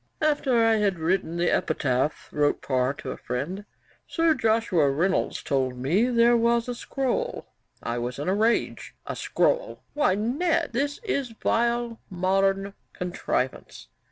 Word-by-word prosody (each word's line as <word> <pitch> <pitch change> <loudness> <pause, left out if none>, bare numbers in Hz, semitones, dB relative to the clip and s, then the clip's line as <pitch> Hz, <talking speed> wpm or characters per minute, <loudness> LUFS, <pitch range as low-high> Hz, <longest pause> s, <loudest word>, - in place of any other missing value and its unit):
'After 295 -5 +2
I 225 -1 +4
had 200 -3 +1
written 165 0 -1
the 175 0 +2
epitaph,' 145 -1 0
wrote 145 -1 +1
Parr 130 -1 +1
to 130 - -6
a - - -6
friend, 160 +12 -4 0.4
'Sir 330 -1 +2
Joshua 220 - +2
Reynolds 170 +8 0
told 130 -2 -1
me 170 - +2
there 240 -1 +4
was 235 0 +2
a 245 - -2
scroll. 270 - -2 0.4
I 120 +1 -2
was 125 +1 -4
in 145 - -4
a 185 - +2
rage. 220 +3 0
A - - -4
scroll! - - 0
Why, 290 -10 +2
Ned, 255 - 0
this 285 +4 -1
is 280 - -1
vile 235 0 0
modern 195 +1 +1 0.2
contrivance. 175 - -3
200 Hz, 145 wpm, -26 LUFS, 155-240 Hz, 0.4 s, I